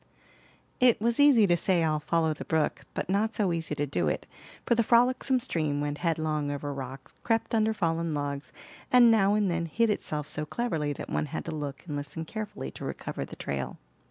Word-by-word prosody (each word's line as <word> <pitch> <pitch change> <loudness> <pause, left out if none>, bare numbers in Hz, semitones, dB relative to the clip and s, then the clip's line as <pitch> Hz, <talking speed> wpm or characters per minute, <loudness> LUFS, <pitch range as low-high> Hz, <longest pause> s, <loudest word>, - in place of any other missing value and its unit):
It 250 -3 +5
was 230 +3 0
easy 280 -7 +7
to 175 -3 +4
say, 175 0 +1
"I'll 155 -1 +1
follow 160 +1 +1
the - - -7
brook," 160 -1 0
but - - -2
not 205 +4 +1
so 195 -5 +1
easy 165 -2 -2
to 145 0 0
do 90 - -1
it; - - -1 0.4
for - - +3
the 235 - +3
frolicsome 250 +3 +3
stream 155 - -1
went 145 0 -2
headlong 155 -3 0
over 145 0 -3
rocks, 135 0 -8
crept 225 -1 0
under 220 -1 +3
fallen 165 -5 -1
logs, 145 0 -4 0.4
and 245 -2 +7
now 205 -2 +4
and 205 -3 +2
then 170 0 -1
hid 230 +6 +2
itself 150 -7 -3
so 150 - -3
cleverly 155 -4 -2
that - - -7
one - - 0
had - - -5
to 165 - -4
look 145 -2 -5
and 150 -4 -4
listen 145 +3 -5
carefully 210 - -5
to - - -10
recover - - -4
the - - -10
trail. 70 -1 -4
165 Hz, 205 wpm, -28 LUFS, 145-220 Hz, 0.4 s, easy